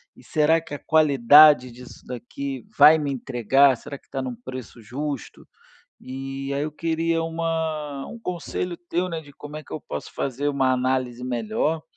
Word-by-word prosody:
E - - -18
será 155 +2 +3
que 160 - -11
a 145 - -4
qualidade 145 -3 +6
disso 125 +1 -13
daqui 130 +1 -6
vai 150 +2 +8
me 145 -2 -2
entregar, 135 +1 +3
será 140 +4 -8
que - - -32
tá 135 - -3
num 130 -2 -4
preço 125 -1 -9
justo?", 135 +4 -6 0.5
e 135 +1 -6
aí 140 +1 -1
eu 155 - -4
queria 165 +1 -1
uma 160 -3 -3
um 235 - -9
conselho 180 -2 -4
teu, 175 +1 -2
né, 165 -2 -4
de 145 -2 -15
como 150 +1 -10
é 155 - -8
que - - -11
eu 155 - -4
posso 75 - -7
fazer 140 +2 -2
uma 135 -2 +2
análise 130 -1 -1
melhor, 125 +6 -1
140 Hz, 175 wpm, -24 LUFS, 130-155 Hz, 0.5 s, vai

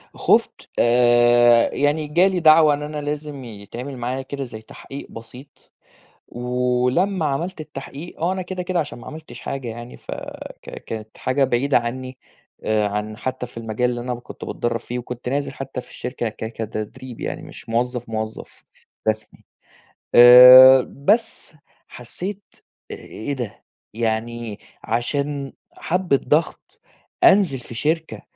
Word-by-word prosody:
خُفت - - +1
آآ 120 0 +5
يعني 150 +2 0
جا 170 +6 +4
لي 190 -2 0
دعوة 155 -2 +6
إن 145 +1 -3
أنا 150 0 -5
لازم 145 -2 -5
يتعمل 120 +5 -8
معايا 125 +2 -3
كده 140 +1 -6
زي 110 -3 -9
تحقيق 135 +5 -10
بسيط 125 +5 -13 0.6
ولمّا 125 +9 0
عملت 155 +4 -2
التحقيق 145 +3 -9
آه 175 +3 +1
أنا 190 - -4
كده 185 0 -5
كده 180 0 -1
عشان 145 -6 -4
ما 120 - -12
عملتش 155 0 -10
حاجة 135 -3 -5
يعني 120 +2 -8
ف - - -11 0.5
ك - - -10
كانت 110 -1 -8
حاجة 135 +2 0
بعيدة 130 +2 +2
عني 130 +2 -4 0.5
آآ 105 -1 +1
عن 105 +1 -4
حتى 130 -1 -4
في 120 - -14
المجال 115 +2 -1
اللي 120 -1 -3
أنا 125 0 -3
كنت 120 - -10
باتدرب 120 -1 -2
فيه 125 +1 -5
وكنت 125 0 -6
نازل 140 +2 -2
حتى 135 -2 -6
في - - -16
الشركة 125 -2 -4
ك 110 - -7
كتدريب 115 +3 -6
يعني - - -4
مش - - -12
موظف، 120 +1 -2
موظف 110 0 -6 0.4
رسمي 110 0 -3 0.7
آآ 125 +2 +10
بس 210 - -1 0.3
حسيت 185 - -7 0.5
إيه 140 +6 -6
ده 120 -6 -6 0.3
يعني 115 -1 -3 0.2
عشان 140 +4 -2 0.2
حبّة 180 -5 0
ضغط 170 - -1 0.4
أنزل 190 - +5
في 120 - -11
شركة 160 +6 -2
125 Hz, 140 wpm, -21 LUFS, 120-150 Hz, 0.7 s, آآ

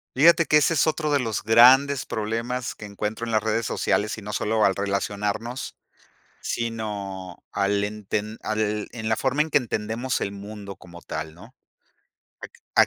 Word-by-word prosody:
Fíjate 165 +5 +6
que 150 - +5
ese 160 +3 +3
es 155 0 +3
otro 155 -1 0
de 145 - +3
los 115 -5 -2
grandes 130 +5 +6
problemas 115 +3 -3
que 105 - -9
encuentro 105 +3 -4
en 115 - -4
las 110 -1 +2
redes 110 +1 0
sociales. 105 0 0
Y - - -8
no 105 +1 -6
solo 110 +1 +2
al 95 - +3
relacionarnos, 100 +5 -2 0.7
sino 100 -5 -4
al 100 +1 +1
enten 105 +1 -3
al 105 -1 -1
en 110 -2 -4
la 110 - +2
forma 135 +3 +1
en 160 - -5
que - - +5
entendemos 120 +1 -2
el 100 - -2
mundo 100 0 -8
como 85 -1 -13
tal, 80 0 -5
¿no? 90 - -15 1.2
¿A - - +7
110 Hz, 170 wpm, -24 LUFS, 100-125 Hz, 1.2 s, A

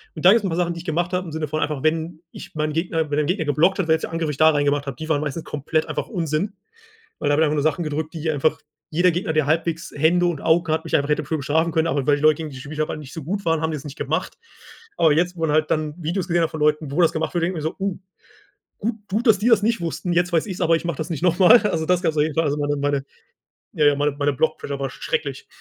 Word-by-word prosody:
Und 155 - -5
da 185 - +10
gibt 230 - +5
es 210 - -13
'n - - 0
paar 165 - -2
Sachen, 175 -1 0
die 170 - -7
ich 175 - -11
gemacht 175 +2 -1
habe, 180 0 -1
im 160 - -7
Sinne 155 -1 -3
von 155 +2 -2
einfach, 145 -2 -2
wenn 160 +1 -1
ich - - -11
meinen 155 0 -1
Gegner 165 -2 -1
wenn 145 - +1
ein 150 - 0
Gegner 180 -2 0
geblockt 160 +7 +2
hat, 190 -5 -1
welchen 160 0 +2
Angriff 165 -1 -2
ich 140 - -7
da 155 0 +6
rein 145 -2 +1
gemacht 145 0 0
habe 135 - -4
die 160 0 -7
waren 150 -2 +2
meistens 150 +2 -4
komplett 155 +2 -2
einfach - - -3
Unsinn, 175 +1 -2 0.7
weil 145 - -2
da 145 - +3
habe 150 - +3
ich 160 - +5
einfach 150 - 0
nur 145 - 0
Sachen 155 +2 +1
gedrückt, 155 +1 -3
die 160 -1 -2
einfach 150 +1 +1 0.3
jeder 175 +3 +3
Gegner, 175 -1 -2
der 155 -3 +2
halbwegs 165 +2 -1
Hände 170 +4 +3
und 170 -4 -2
Augen 165 0 +2
hat, 160 - -2
mich - - 0
einfach 140 +1 +1
hätte 150 0 0
für 160 +3 -2
bestrafen 160 +4 0
können, 160 0 +2
aber 140 -3 -1
weil 145 - +5
die 145 - -5
Leute 155 -1 +5
gegen 160 -2 -5
die - - -10
ich 130 - -8
spielt 150 +1 -8
habe 155 - -1
nicht 140 -3 -10
so 165 - -6
gut 195 +6 -3
waren, 165 -1 +2
haben 160 0 0
die - - -2
das 140 - -10
nicht 145 +1 -8
gemacht. - - -2 0.6
Aber 160 -3 +4
jetzt, 175 +3 +1
wo 165 - -9
man 160 -2 +1
halt 155 +1 +2
dann 155 -1 0
Videos 170 +3 -2
gesehen 175 0 +2
hat - - -1
von 160 - -6
Leuten, 150 0 +1
wo 160 +6 +1
das 165 - +4
gemacht 160 +3 -2
wird, 170 -1 0
denke 175 0 -1
ich - - -6
mir 160 - +2
so: - - -13
„Oh. 195 -1 -2 0.8
Gut 220 +2 -2
gut, 220 +6 -1
dass 210 -3 +6
die 220 +5 +1
das 220 -4 +5
nicht 230 -1 +1
wussten, 170 +1 -3
jetzt 175 +1 +1
weiß 165 +4 +2
ich's, 190 -3 -6
aber 165 - +3
ich 165 - -5
mache 170 -5 -2
das 155 +2 -3
nicht 165 0 -4
nochmal.“ 185 +6 +6
Also, 160 -6 0
das 180 0 +2
gab's 160 -3 0
auf 150 - +4
jeden 155 -1 -1
Fall. 165 0 +2
Also 145 0 0
meine 145 0 0
meine 140 -1 -1 0.7
ja, 155 -4 +2
ja, 145 -1 +5
meine 145 +1 +1
meine 145 0 +1
Block 160 +4 0
Pressure 140 -1 -5
war 135 -1 -2
schrecklich. 455 - -4
160 Hz, 310 wpm, -22 LUFS, 150-175 Hz, 0.8 s, da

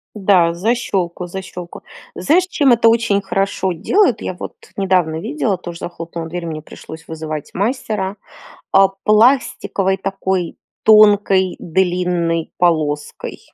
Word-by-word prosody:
Да, 185 -5 +3
защелку, 185 -3 -1
защелку. 180 -1 -8 0.3
Знаешь, 350 +5 +2
чем 290 -7 +2
это 230 -1 +4
очень 225 -3 +2
хорошо 195 -1 -1
делают? 240 - +2
Я - - -3
вот - - -7 0.2
недавно 185 -5 +1
видела 225 - -2
тоже 175 -1 -8
захлопнула 170 -1 -6
дверь, 175 +1 -5
мне 155 -2 -5
пришлось 160 +1 -12
вызывать 155 -2 -6
мастера, 205 -2 -2 0.6
а, 195 0 +6 0.2
пластиковой 215 -4 +2
такой 190 -2 -2 0.3
тонкой 205 -3 +5
длинной 175 -2 0
полоской. 155 -4 -1
190 Hz, 115 wpm, -18 LUFS, 170-210 Hz, 0.6 s, а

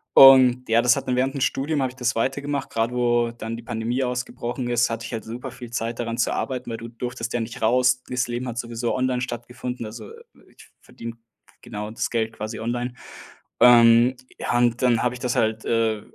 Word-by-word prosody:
Und 130 -2 +8
ja, 115 +1 +4
das 125 0 +4
hat - - -5
dann 125 - +1
während 130 +1 0
Studium 145 +3 0
habe 130 - -1
ich 130 - -18
das 125 0 -1
weitergemacht. 140 +4 -2
Gerade 115 +2 -1
wo 120 -1 +2
dann 115 -1 -6
die 115 - -8
Pandemie 115 +3 -2
ausgebrochen 125 0 -3
ist, 120 0 +2
hatte 115 0 -4
ich 115 - -7
halt 115 - -4
super 125 +4 -7
viel 125 -1 -10
Zeit, 115 0 -3
daran 115 -1 -3
zu 120 - +1
arbeiten, 125 -2 -3
weil 115 - -4
du 115 +1 -8
durftest 120 0 -5
ja 120 - 0
nicht 115 0 -6
raus. 125 +2 +3
Das 125 0 -1
Leben 120 +1 -4
hat 120 -1 -5
sowieso 115 0 -2
online 130 -1 0
stattgefunden, 125 0 -5
also 110 -1 -9 0.4
ich - - -18
verdiene, 115 0 -9 0.5
genau, 105 +1 -6
das 115 - -2
Geld 110 -1 -1
quasi 110 +1 -6
online. 120 +2 -3 0.7
Ähm, 120 +1 +7 0.2
ja 120 - 0
und 120 0 +2
dann 120 -3 +3
habe 125 0 +1
ich 125 - -8
das 125 +1 -2
halt, 110 -2 0
äh, 110 -2 +1
120 Hz, 210 wpm, -23 LUFS, 115-125 Hz, 0.7 s, Und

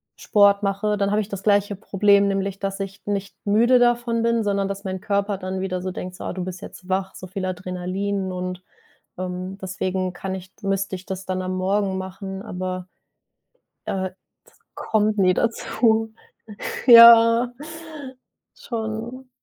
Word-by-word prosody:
Sport 200 -1 +3
mache, 200 +2 0
dann 200 0 0
habe 210 +1 +2
ich 210 - -7
das 200 -1 -6
gleiche 205 -1 +2
Problem. 200 0 +3
Nämlich, 195 0 -2
dass 195 0 -3
ich 195 0 -6
nicht 200 -1 -3
müde 235 +5 +4
davon 240 -1 +2
bin, 230 -1 +2
sondern 200 -1 0
dass 200 +1 -5
mein 190 -1 -4
Körper 200 -1 0
dann 185 0 -4
wieder 185 -1 -3
so 185 - -3
denkt: 180 0 -7
„So - - -9
ah, - - -4
du 185 -1 -4
bist 185 -1 -6
jetzt 185 0 -11
wach“, 190 0 -1
so 185 - -9
viel 190 0 -4
Adrenalin 185 +2 -3
und 180 0 -5 0.6
ähm, 185 +1 -5
deswegen 185 -1 -2
kann 190 +1 -5
ich 185 0 -9
müsste 195 -1 -1
ich 185 0 -8
das 190 0 -5
dann 185 0 -2
am 185 0 -3
Morgen 195 +1 0
machen, 190 +1 -6
aber, 185 -3 -5 1.0
äh, 190 -1 -2
das 185 - -31 0.6
kommt 215 -1 +2
nie 185 -2 +4
dazu. 225 0 +1 0.7
Ja, 235 0 +9 1.0
schon. 235 +2 -5
195 Hz, 160 wpm, -23 LUFS, 185-210 Hz, 1.0 s, Ja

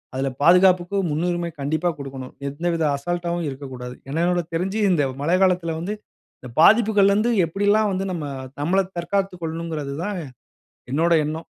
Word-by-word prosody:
அதில 135 +1 0
பாதுகாப்புக்கு 180 +3 +5
முன்னுரிமை 175 +2 -1
கண்டிப்பா 155 +5 0
கொடுக்கணும். 135 -2 -8 0.2
எந்தவித 165 +3 -1
அசால்ட்டாவும் 170 +2 -2
இருக்கக்கூடாது. 130 -2 -7
என்ன 160 +4 -1
என்னுடைய 175 -1 +1
தெரிஞ்சி 190 +5 -1
இந்த 160 -5 +3 0.2
மழை 170 +5 +2
காலத்தில 180 -3 +1
வந்து 195 +5 -3 0.5
இந்த 125 - -9
பாதிப்புகள்லருந்து 215 +1 +5
எப்பிடிலாம் 205 +5 +2
வந்து 190 +1 -2
நம்ம 165 -4 -4 0.4
நம்மள 185 +6 +2 0.2
தற்காத்துக் 190 +1 -2
கொள்ளணுங்கிறது 160 -3 -4
தான் 205 -1 -3 0.7
என்னோட 165 +5 +2
எண்ணம். 155 +2 -4
170 Hz, 135 wpm, -22 LUFS, 150-190 Hz, 0.7 s, பாதுகாப்புக்கு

